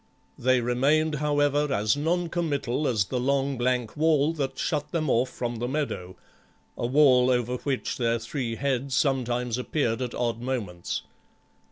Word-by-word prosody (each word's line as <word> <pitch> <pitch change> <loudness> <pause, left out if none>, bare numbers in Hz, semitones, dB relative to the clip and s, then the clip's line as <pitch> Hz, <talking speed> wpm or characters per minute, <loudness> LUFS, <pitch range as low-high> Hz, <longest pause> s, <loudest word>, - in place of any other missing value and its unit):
They 130 0 +3
remained 140 +6 +2
however, 145 0 +2
as 110 -1 +2
non 170 +4 0
committal 150 -5 -1
as 110 -5 +1
the 125 +7 -2
long 140 +2 +1
blank 125 -2 -1
wall 155 0 +3
that 135 -4 -3
shut 150 -1 -2
them 155 -4 0
off 125 +3 +2
from 120 -2 -4
the 120 +2 -2
meadow, 130 -10 -3 0.6
a 120 - -2
wall 130 -2 +5
over 125 0 +1
which 135 0 -2
their 115 -1 +2
three 115 0 -4
heads 135 0 -1
sometimes 125 -3 0
appeared 125 -3 -1
at 125 -2 -3
odd 115 -1 -1
moments. 110 -9 -3
130 Hz, 155 wpm, -26 LUFS, 120-145 Hz, 0.6 s, wall